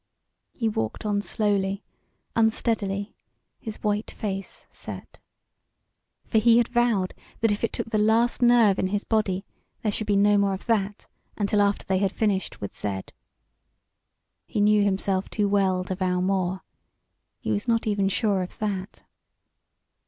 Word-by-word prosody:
He 230 - -2
walked 110 - -2
on 205 -1 +1
slowly, 200 -2 0 0.5
unsteadily, 220 -3 +1 0.5
his 220 -1 -6
white 210 0 0
face 195 -3 -5
set. - - -8 1.1
For 220 - +2
he 230 +1 +5
had 240 -1 +3
vowed 235 -6 +1 0.3
that 225 -2 +3
if 205 - -2
it 230 - +1
took 225 - -4
the 215 - +2
last 225 +4 +3
nerve 235 -5 +5
in - - +1
his 205 +2 -1
body 200 -4 0 0.4
there 215 - +1
should 215 +1 -3
be 205 - +2
no 205 +1 +4
more 200 -1 +2
of 190 - -10
that 205 -3 -1 0.3
until 205 0 +2
after 200 0 +1
they 190 -1 +1
had 195 -1 +1
finished 200 -4 -1
with 100 - -6
Z. 95 -2 -3 1.5
He - - -2
knew 210 0 +5
himself 195 -1 0
too 210 -2 0
well 190 -2 +2
to 185 - -3
vow 180 -1 0
more. 185 0 0 0.8
He - - -3
was 205 +4 -1
not 230 -1 +2
even 200 -2 +1
sure 200 -1 +1
of 180 - -6
that. 200 -2 -4
205 Hz, 155 wpm, -25 LUFS, 195-220 Hz, 1.5 s, he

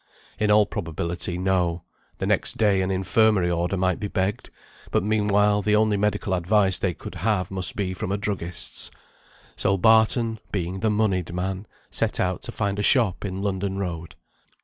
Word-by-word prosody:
In 105 -1 +1
all 105 0 +5
probability, 85 0 -3
no; 90 -2 0 0.3
the - - -3
next - - 0
day 100 -3 +3
an 95 - -1
infirmary 95 0 +2
order 85 +3 -1
might 95 -1 0
be 105 - -3
begged, 95 +1 -2 0.4
but - - +1
meanwhile 105 -1 +2
the 105 +1 +2
only 110 -1 +3
medical 100 -1 0
advice 95 +1 +2
they 90 -4 -1
could - - -9
have 95 -2 -1
must 95 -2 +2
be 95 -3 -2
from 95 +1 -4
a 100 - 0
druggist's. 95 -4 -2 0.7
So 100 -1 +1
Barton 110 +2 +3
(being 95 -1 -3
the 110 - +1
moneyed 100 -5 0
man) 95 +2 -3 0.2
set - - -1
out - - 0
to - - -6
find 100 0 -2
a - - +1
shop 110 -4 +3
in 95 -1 -4
London 95 -1 -2
Road. 85 -4 -5
95 Hz, 170 wpm, -24 LUFS, 90-105 Hz, 0.7 s, all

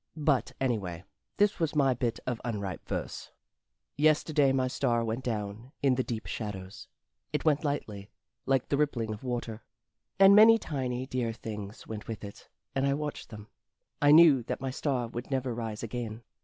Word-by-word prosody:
But, 145 -3 +1
anyway, 100 -10 -2 0.3
this 205 0 +2
was 160 -2 0
my 135 -3 +4
bit 120 -2 -2
of 120 -2 -3
unripe 100 -6 -4
verse: - - -4 0.7
Yesterday 150 -1 +3
my 130 -1 +1
star 120 -3 0
went 115 +3 -3
down 110 +1 -4
in 135 -2 +4
the 130 0 0
deep 115 -3 -4
shadows. 95 -3 -6 0.4
It - - -2
went 150 -1 +3
lightly 105 -9 -3 0.4
Like 135 -2 +1
the 140 - +1
rippling 120 -7 0
of 105 - -10
water; 120 -3 -4 0.6
And 195 +1 +8
many 225 +2 +9
tiny 130 - -3
dear 125 -3 -2
things 105 0 -7
went 110 -1 -7
with 110 -2 -6
it, 100 -1 -10 0.2
and 135 +1 +1
I 140 - +2
watched 150 0 -5
them: 105 -2 -10 0.5
I 145 - +5
knew 155 -4 +8
that - - -3
my 135 0 -3
star 130 -3 -1
would 120 +2 -7
never 130 -2 -1
rise 115 -2 -5
again. 115 -1 -5
125 Hz, 170 wpm, -29 LUFS, 110-140 Hz, 0.7 s, many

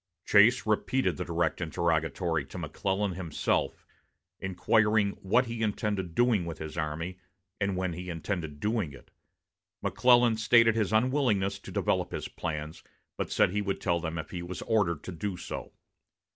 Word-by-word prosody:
Chase 110 +5 +5
repeated 110 +5 +1
the 90 - -2
direct 85 +1 -1
interrogatory 80 -2 0
to - - -10
McClellan 100 +1 -1
himself, 85 -4 -1 0.5
inquiring 105 +2 +2
what 120 +7 +3
he 115 -1 -5
intended 100 -5 -1
doing 120 -6 +3
with 80 -2 -5
his 80 -1 -7
army, 80 +3 -3 0.4
and 100 -2 0
when 95 -2 -1
he 90 +2 -6
intended 80 -3 -4
doing 105 -7 -1
it. 70 - -15 0.7
McClellan 120 -2 +4
stated 115 +1 +5
his 110 -3 0
unwillingness 110 -4 +2
to - - -11
develop - - 0
his - - -3
plans, 75 0 -5 0.3
but - - -4
said - - +3
he 105 +2 0
would 100 -1 -2
tell 85 -2 +1
them 80 0 -4
if 80 - -6
he 90 - -4
was 85 +1 -6
ordered 95 -9 +1
to - - -6
do 90 +2 -4
so. - - -6
95 Hz, 160 wpm, -29 LUFS, 85-110 Hz, 0.7 s, Chase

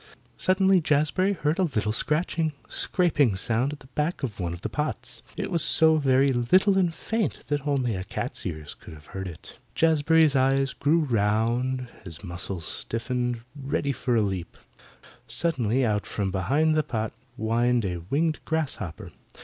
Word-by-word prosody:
Suddenly 190 0 +3
Jazbury 155 +6 +1
heard 160 -1 -1
a - - +4
little 110 - 0
scratching, 155 +5 +1
scraping 150 - +3
sound 120 +9 0 0.2
back 150 +2 -2
of 115 -7 -4
one 85 -2 -2
of 85 +1 -7
the - - -2
pots. 150 +1 -4 0.2
It - - -3
was 170 -3 +5
so 160 -1 +6
very 135 -1 +3
little 185 - +3
and 185 -3 +2
faint 215 +3 -3
that 145 -1 -1
only 130 -6 0
a 95 - -4
cat's - - -4
ears 80 -4 -6
could - - -13
have 75 0 -16
heard 95 0 -4
it. 85 - -10 0.2
Jazbury's 160 -1 +3
eyes 135 0 +2
grew 160 +4 +2
round, 120 +1 0
and 125 - -9
his 85 -1 -4
muscles 85 -1 -4
stiffened 120 +3 -2
ready 140 0 -2
for 125 -2 -1
a 110 - +3
leap. 95 -4 -4 0.7
Suddenly 130 -6 0
out 105 -2 -1
from 100 -2 -2
behind 140 - +1
the 155 - +3
pot 110 -6 -3 0.2
whined 120 +1 +1
a 90 -2 -2
winged 155 +2 +1
grasshopper. 140 - -3
135 Hz, 160 wpm, -26 LUFS, 110-155 Hz, 0.7 s, so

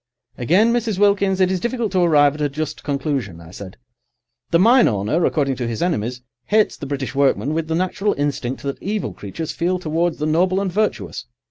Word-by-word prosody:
"Again, 190 - +3
Mrs. 230 -4 -1
Wilkins, 200 -1 +2
it 185 0 +3
is 185 - 0
difficult 235 0 -2
to 190 - +1
arrive 150 -5 +4
at 150 - -7
a 145 - +1
just 150 +2 -5
conclusion," 140 - -2
I 85 0 -13
said. 95 0 -10 0.7
"The 165 - +4
mine 235 +7 +5
owner, 110 - 0
according 140 -4 0
to 120 - -3
his 115 +3 -2
enemies, 125 -7 -2 0.2
hates 215 0 +2
the 140 - -8
British 135 -1 -4
workman 135 -1 +1
with 160 0 -2
the 160 - -1
natural 185 +4 0
instinct 140 -3 -2
that 140 -1 -4
evil 210 +2 -3
creatures 125 +11 -6
feel 180 +2 -1
towards 170 0 -1
the 150 - -2
noble 180 +5 +2
and 195 -2 -2
virtuous. 215 +4 -2
160 Hz, 200 wpm, -20 LUFS, 140-190 Hz, 0.7 s, mine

